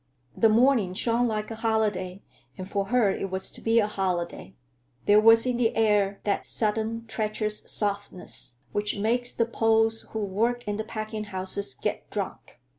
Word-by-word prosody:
The 225 - +4
morning 225 -5 +3
shone 235 +3 +1
like 215 -1 -3
a 225 - -6
holiday, 210 -4 -1 0.3
and 185 -1 -6
for 200 0 -1
her 220 -1 +2
it 195 - -3
was 190 0 -4
to - - -7
be 225 +1 +2
a 220 - +5
holiday. 180 - -3 0.5
There 205 +1 +6
was 225 +1 +6
in 250 -1 0
the 235 -2 +1
air 205 -3 +2
that 205 - -1
sudden, 225 +1 +1
treacherous 215 -1 -2
softness 200 - -2
which 210 0 -1
makes 240 +4 +2
the 230 - 0
Poles 225 -1 +1
who 220 -2 -3
work 230 +5 -1
in 205 0 -2
the 220 - -2
packing 215 -1 -5
houses 190 -6 -4
get - - -4
drunk. - - -6
215 Hz, 170 wpm, -26 LUFS, 200-225 Hz, 0.5 s, There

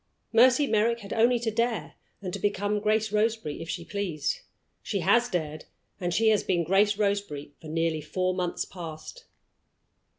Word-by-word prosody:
Mercy 255 +5 +6
Merrick 230 0 +1
had 200 - -6
only 235 +2 +4
to 230 -1 -2
dare, 230 +1 -1 0.3
and 180 -2 -4
to - - -3
become 205 +1 0
Grace 215 0 +1
Roseberry 215 -8 0
if 165 - -7
she 170 - -4
pleased. 175 -8 -2 0.4
She - - -2
has 240 0 +3
dared, 155 -5 -3 0.3
and 175 -2 -1
she 220 +5 +3
has 215 -2 +4
been 175 -2 +1
Grace 200 +4 +3
Roseberry 200 -9 -1
for 160 - -10
nearly 160 0 0
four 185 +4 -1
months 180 -1 -2
past. 170 - -9
200 Hz, 165 wpm, -27 LUFS, 170-220 Hz, 0.4 s, Mercy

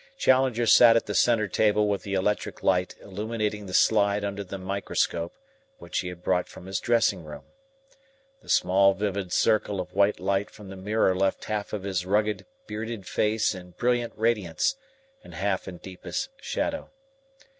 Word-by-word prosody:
Challenger 130 - +3
sat 115 +1 +7
at 115 - +2
the 105 - -4
centre 115 -1 +3
table 105 +1 +2
with 100 -1 0
the 100 -1 -3
electric 105 +2 -1
light 90 -1 +1
illuminating 105 +1 -3
the 90 - -8
slide 100 -1 +3
under 100 0 -3
the 95 +1 -7
microscope 95 -3 -2 0.4
which - - -4
he - - -3
had 90 0 -8
brought 90 -1 +1
from - - -12
his 95 -1 -2
dressing 115 -6 +2
room. 75 -1 -9 1.0
The - - -18
small 100 +1 +4
vivid 100 -2 -2
circle 105 -2 +2
of 90 - -5
white 100 +2 +2
light 100 +1 0
from 105 -2 -13
the 95 - -8
mirror 95 0 +1
left 95 +1 0
half 105 -1 -3
of 105 -3 -4
his 95 -3 -1
rugged, 105 +3 0 0.2
bearded 110 -1 -5
face 110 +3 +1
in 90 -2 -11
brilliant 120 -1 0
radiance 105 - 0 0.5
and - - -12
half 95 +1 -1
in 90 -2 -7
deepest 95 - -5
shadow. 285 -1 -3
100 Hz, 165 wpm, -26 LUFS, 95-110 Hz, 1.0 s, sat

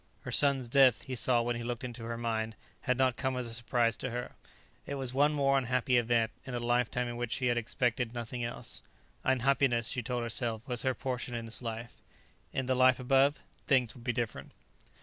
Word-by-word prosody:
Her - - -6
son's 140 -3 +4
death, 130 -1 +5
he 130 - -6
saw 120 -1 +2
when 120 0 -1
he 120 - -4
looked 120 +1 -4
into 120 -2 -6
her 115 0 -4
mind, 110 -1 -2 0.3
had 125 0 0
not 130 -2 +2
come 130 -1 -1
as 125 - -2
a 115 - -4
surprise 115 -1 +1
to 130 - -3
her; 120 +1 -4 0.6
it 140 - -3
was 130 -2 -2
one 145 +3 +4
more 140 -2 +3
unhappy 125 0 +1
event, 115 -1 +1
in 130 - -6
a - - -1
lifetime 120 +1 0
in 120 0 -5
which 120 -1 -2
she 130 - -1
had 120 -1 +3
expected 120 0 -1
nothing 120 0 -5
else. 120 - -4 0.4
Unhappiness, 130 -2 +2
she 125 - 0
told 120 +1 -2
herself, 115 0 -2
was 125 -3 -2
her 130 -1 0
portion 125 -1 -3
in 115 -1 -4
this 115 +2 -3
life; 115 0 -6 0.5
in 130 - -2
the 130 - +1
Life 130 0 +5
Above, 135 +3 +3 0.3
things 125 -4 +3
would 120 - -14
be 125 - 0
different. 120 -2 -4
125 Hz, 210 wpm, -31 LUFS, 115-130 Hz, 0.6 s, death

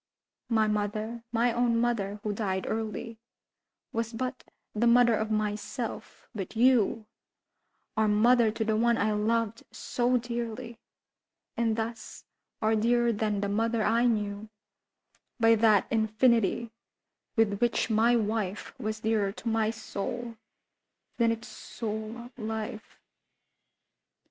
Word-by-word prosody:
My 220 -2 +3
mother—my 225 +3 -1
own 235 -1 +2
mother, 210 -4 -1
who 210 - -1
died 190 -3 -2
early, 225 +1 -4 0.7
Was 230 0 -2
but 255 +2 -4 0.3
the 230 +3 +2
mother 240 0 +6
of 220 0 -1
myself; 215 +2 -3
but 200 -1 -6
you 235 -2 +3 0.9
Are 220 0 +2
mother 230 +2 +4
to 220 +1 -2
the 220 0 +1
one 235 +1 +3
I 215 +1 +1
loved 225 +1 0
so 250 +1 0
dearly, 235 -1 -5 0.8
And 230 -2 +1
thus 225 0 -5 0.4
are 220 +1 +3
dearer 235 +2 +2
than 210 -1 -1
the 200 - 0
mother 225 +2 0
I 230 +3 +3
knew 210 -2 -1 0.9
By 225 0 +6
that 215 -3 +4
infinity 225 0 +2 0.6
with 215 -3 +2
which 240 0 +1
my 230 +3 +4
wife 210 -3 -2
Was 215 0 -3
dearer 215 -3 +1
to 230 - -8
my 225 -1 +2
soul 230 +2 -5 0.8
than 230 -1 +3
its 230 0 -4
soul 225 +2 -6
life. 220 -1 -5
225 Hz, 120 wpm, -28 LUFS, 215-235 Hz, 0.9 s, mother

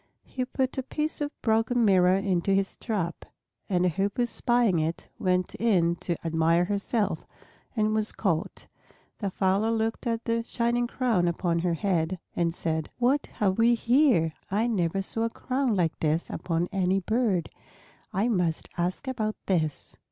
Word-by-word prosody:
He 255 -1 -4
put 265 +1 -1
a - - +1
piece 305 +4 -3
of 290 - 0
broken 225 +1 +2
mirror 185 -2 +5
into 195 -1 +1
his 195 0 0
trap, 185 -7 -3 0.5
and 180 -2 +2
a - - +4
Hoopoe 200 +7 0
spying 240 -5 +2
it 160 +2 -2
went 180 -1 +1
in 180 -7 +2
to 170 - -2
admire 165 +1 +2
herself, 205 +1 0 0.6
and 215 -1 +2
was 215 -1 +1
caught. 170 -6 -2 0.5
The 200 - -1
fowler 195 +3 +1
looked 225 +1 -1
at 230 0 -1
the 230 0 0
shining 240 +1 0
crown 235 -9 +1
upon 170 0 0
her 170 0 0
head 180 -1 0 0.2
and 170 -1 0
said, 160 -3 -2
"What 255 +4 +2
have 195 0 0
we 235 +1 +5
here! 235 - +3 0.2
I 210 +4 +1
never 195 -4 0
saw 225 +4 -2
a - - 0
crown 255 0 -1
like 170 -4 0
this 160 +2 0
upon 170 0 -1
any 190 -1 +1
bird. 210 - 0 0.6
I 200 +5 +1
must 180 -8 0
ask 180 +9 -2
about 215 -4 -1
this." 160 -6 -1
195 Hz, 160 wpm, -27 LUFS, 175-230 Hz, 0.6 s, mirror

